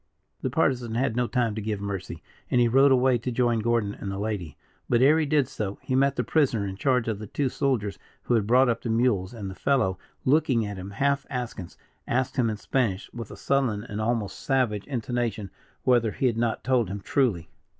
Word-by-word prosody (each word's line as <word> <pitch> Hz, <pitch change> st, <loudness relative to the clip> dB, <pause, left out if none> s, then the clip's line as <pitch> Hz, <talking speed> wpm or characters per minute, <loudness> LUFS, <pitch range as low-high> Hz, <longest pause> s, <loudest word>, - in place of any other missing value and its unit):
The 130 Hz, -, -1 dB
Partisan 125 Hz, -5 st, 0 dB
had 120 Hz, -2 st, 0 dB
no 125 Hz, 0 st, +1 dB
time 120 Hz, -3 st, 0 dB
to 110 Hz, -, -4 dB
give 105 Hz, -1 st, -2 dB
mercy, 95 Hz, -5 st, -5 dB, 0.3 s
and 125 Hz, -, +3 dB
he 120 Hz, -, +5 dB
rode 135 Hz, +4 st, +5 dB
away 130 Hz, -1 st, +4 dB
to 125 Hz, +2 st, -3 dB
join 120 Hz, -1 st, +1 dB
Gordon 110 Hz, -2 st, 0 dB
and 100 Hz, -, -6 dB
the 95 Hz, -, -4 dB
lady; 100 Hz, -7 st, -4 dB, 0.3 s
but, 120 Hz, -, +3 dB
ere 145 Hz, +5 st, +5 dB
he 155 Hz, -, 0 dB
did 145 Hz, -3 st, +2 dB
so, 100 Hz, -2 st, -4 dB
he -, -, -3 dB
met 135 Hz, +1 st, +3 dB
the -, -, 0 dB
prisoner 130 Hz, -10 st, +1 dB
in 95 Hz, -1 st, -4 dB
charge 125 Hz, +2 st, +1 dB
of 110 Hz, -3 st, -2 dB
the 105 Hz, -, -7 dB
two 135 Hz, +5 st, -1 dB
soldiers 125 Hz, -8 st, -1 dB, 0.2 s
who -, -, 0 dB
had 110 Hz, -3 st, +2 dB
brought 125 Hz, +3 st, +5 dB
up 120 Hz, -, 0 dB
the 120 Hz, -, -4 dB
mules, 110 Hz, -5 st, +1 dB
and 110 Hz, -5 st, -6 dB
the 95 Hz, -, -5 dB
fellow, 95 Hz, -6 st, +1 dB, 0.3 s
looking 130 Hz, -5 st, +3 dB
at 100 Hz, -1 st, -5 dB
him 95 Hz, +1 st, -7 dB
half 140 Hz, +6 st, 0 dB
askance, 125 Hz, -8 st, -5 dB, 0.3 s
asked 130 Hz, +3 st, -1 dB
him 120 Hz, -3 st, +3 dB
in 110 Hz, -, -3 dB
Spanish, 105 Hz, -4 st, -1 dB
with 115 Hz, -3 st, -7 dB
a -, -, -10 dB
sullen 125 Hz, -7 st, 0 dB
and 105 Hz, -2 st, -5 dB
almost 110 Hz, -2 st, -1 dB
savage 125 Hz, -7 st, 0 dB
intonation, 120 Hz, -5 st, -2 dB, 0.3 s
whether 120 Hz, -4 st, +3 dB
he 135 Hz, -, -2 dB
had 120 Hz, -3 st, +2 dB
not 115 Hz, -1 st, -1 dB
told 120 Hz, -5 st, +2 dB
him 100 Hz, +1 st, -4 dB
truly. 95 Hz, -, 0 dB
120 Hz, 220 wpm, -26 LUFS, 105-130 Hz, 0.3 s, he